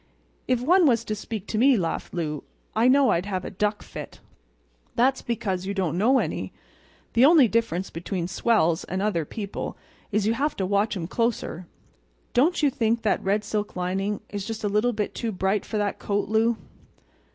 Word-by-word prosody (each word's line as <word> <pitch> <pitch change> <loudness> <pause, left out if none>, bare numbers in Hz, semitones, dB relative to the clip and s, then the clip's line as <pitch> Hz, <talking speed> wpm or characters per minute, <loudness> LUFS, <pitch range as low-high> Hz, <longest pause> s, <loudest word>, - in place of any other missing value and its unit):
"If 255 -2 +1
one 345 +5 +5
was 230 -3 +2
to 215 - -2
speak 210 -1 -5
to 215 - -2
me," 265 +1 +5
laughed 170 -4 -2
Lou, 155 -4 -3 0.3
"I 225 +3 +4
know 270 +1 +5
I'd 175 +4 0
have 185 -2 -3
a - - -5
duck 210 +2 -1
fit." - - -9 0.8
"That's 260 +2 +3
because 195 -6 -2
you 200 - -2
don't 180 -5 0
know 235 +9 +4
any. - - -2 0.6
The 235 - +5
only 295 -3 +7
difference 215 -5 -1
between 170 +1 -3
swells 185 -5 +2
and 185 - -3
other 195 -6 0
people 200 +4 -5 0.3
is 210 0 +1
you 220 - +3
have 290 +5 -1
to 190 - -1
watch 200 +2 +1
'em 170 - -3
closer. 205 -4 -2 0.7
Don't 310 +6 +3
you 285 - +4
think 230 -3 0
that 215 - +1
red 205 +2 +1
silk 210 0 -3
lining 190 +3 -1
is 205 -1 -4
just 220 +1 -5
a - - +1
little 210 +4 +2
bit 210 -3 -3
too 230 - -3
bright 190 +1 0
for 220 - -2
that 205 -1 -1
coat, 205 -1 -1
Lou?" 220 +2 +2
210 Hz, 190 wpm, -25 LUFS, 190-235 Hz, 0.8 s, only